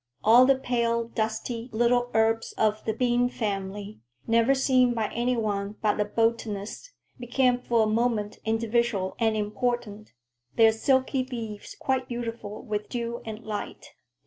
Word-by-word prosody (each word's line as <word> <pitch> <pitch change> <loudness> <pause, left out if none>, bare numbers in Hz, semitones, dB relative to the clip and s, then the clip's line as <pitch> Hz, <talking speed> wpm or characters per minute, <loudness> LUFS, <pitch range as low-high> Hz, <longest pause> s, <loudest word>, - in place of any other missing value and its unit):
All 240 +4 +7
the 275 - +5
pale, 235 -2 0
dusty 225 +2 -3
little 240 +2 +2
herbs 225 0 +2
of 215 0 0
the 220 - +1
bean 245 0 +2
family, 205 -2 -4 0.3
never 230 +4 +3
seen 255 -2 +3
by 220 -2 -1
any 245 +1 0
one 205 -2 -2
but 210 0 +2
a 210 - +2
botanist, 225 - -2 0.3
became 250 +1 +2
for 235 -2 +2
a - - +2
moment 215 -1 0
individual 225 -3 0
and 220 -2 +2
important, 215 0 -3 0.4
their 225 -1 +6
silky 260 +3 +1
leaves 230 -5 -7
quite 260 -2 -1
beautiful 230 -3 -5
with 210 0 -4
dew 235 -1 -4
and 220 0 -7
light. 210 -1 -6
230 Hz, 145 wpm, -26 LUFS, 215-245 Hz, 0.4 s, All